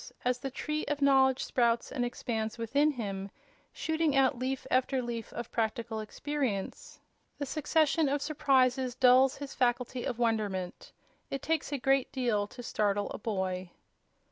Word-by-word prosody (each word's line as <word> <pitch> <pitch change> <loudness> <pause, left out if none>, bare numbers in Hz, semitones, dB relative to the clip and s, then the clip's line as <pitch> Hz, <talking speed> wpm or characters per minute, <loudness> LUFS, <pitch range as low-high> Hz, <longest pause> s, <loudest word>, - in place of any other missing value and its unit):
As 250 0 +1
the 270 - -4
tree 300 +3 -3
of 295 -1 -2
knowledge 265 -2 +4
sprouts 235 -2 +1
and 250 - -1
expands 225 -2 -3
within 280 +6 +2
him, 200 -8 -4 0.4
shooting 320 -2 0
out 270 -1 +4
leaf 260 +1 -2
after 255 +1 +2
leaf 235 -2 -4
of 235 0 -6
practical 225 0 -2
experience, 235 -1 -3 0.4
the 285 - -3
succession 310 +1 +2
of 285 +1 +1
surprises 265 -4 +2
dulls 255 +1 +5
his 280 -1 -7
faculty 245 0 0
of 245 - -3
wonderment. 210 -6 -1 0.4
It 275 - -4
takes 320 -2 -1
a 285 - 0
great 270 0 +2
deal 235 -6 0
to 245 +3 -10
startle 205 -2 0
a - - -6
boy. 190 -4 -2
250 Hz, 150 wpm, -30 LUFS, 225-275 Hz, 0.4 s, dulls